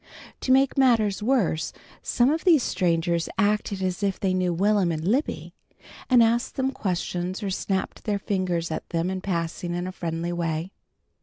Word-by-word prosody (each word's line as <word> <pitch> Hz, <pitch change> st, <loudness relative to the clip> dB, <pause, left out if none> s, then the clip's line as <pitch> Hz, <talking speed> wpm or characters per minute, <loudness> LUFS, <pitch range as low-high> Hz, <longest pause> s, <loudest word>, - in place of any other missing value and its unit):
To 255 Hz, -, -1 dB
make 270 Hz, +1 st, +4 dB
matters 225 Hz, -6 st, +3 dB
worse 210 Hz, -9 st, +1 dB, 0.3 s
some 245 Hz, +3 st, +2 dB
of 320 Hz, +1 st, -1 dB
these 325 Hz, -9 st, +5 dB
strangers 170 Hz, -2 st, 0 dB
acted 205 Hz, -2 st, 0 dB
as 185 Hz, +1 st, -2 dB
if 200 Hz, -2 st, 0 dB
they 190 Hz, -2 st, +1 dB
knew 185 Hz, -1 st, +1 dB
Will'm 195 Hz, 0 st, +2 dB
and 160 Hz, +1 st, -3 dB
Libby, 260 Hz, +9 st, -1 dB, 0.6 s
and 245 Hz, -2 st, +6 dB
asked 235 Hz, +2 st, +1 dB
them 265 Hz, 0 st, 0 dB
questions 185 Hz, -3 st, -3 dB
or 195 Hz, -, -2 dB
snapped 190 Hz, 0 st, -3 dB
their 210 Hz, -2 st, 0 dB
fingers 185 Hz, -5 st, -1 dB
at 155 Hz, -, -5 dB
them 170 Hz, +2 st, -1 dB
in 190 Hz, -1 st, -3 dB
passing 175 Hz, -1 st, -2 dB
in 175 Hz, 0 st, -2 dB
a 185 Hz, -, -4 dB
friendly 170 Hz, -1 st, -3 dB
way. 165 Hz, +1 st, -2 dB
190 Hz, 170 wpm, -25 LUFS, 175-220 Hz, 0.6 s, and